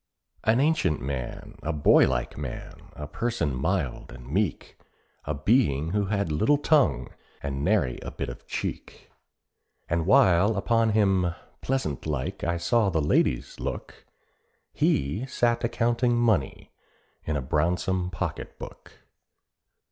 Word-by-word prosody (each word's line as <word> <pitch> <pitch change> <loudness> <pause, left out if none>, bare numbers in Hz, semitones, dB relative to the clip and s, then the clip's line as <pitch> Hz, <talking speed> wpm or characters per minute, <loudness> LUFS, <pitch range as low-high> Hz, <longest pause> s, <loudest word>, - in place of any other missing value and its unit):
An 110 +3 +3
ancient 140 - +2
man, 65 -1 -5
a 80 - -2
boy 75 -2 +5
like - - -2
man, 70 -4 -6 0.2
a 75 - -6
person 85 - -2
mild 80 0 -2
and - - -11
meek, 90 +3 -2 0.5
A 75 - -2
being 80 - +2
who 105 +1 +1
had 100 -4 -1
little 110 - +3
tongue, 140 - +2 0.3
and 70 -1 -3
nary 90 - +1 0.2
bit - - -2
of 60 0 -9
cheek. - - -6 0.8
And 85 0 -1
while 105 -4 +5
upon 115 +2 +2
him 95 -5 +2 0.3
pleasant 125 - -2
like 70 -4 -3
I 85 0 0
saw 100 +5 +2
the 80 -3 0
ladies 70 -4 +1
look, - - -6 0.7
He 75 - 0
sat 120 -2 +1
a 115 - +1
counting 120 +1 +1
money 110 - 0 0.5
in 80 - -1
a - - -2
brownsome 90 +5 0
pocket 80 - -5
book. - - -12
90 Hz, 135 wpm, -26 LUFS, 75-115 Hz, 0.8 s, boy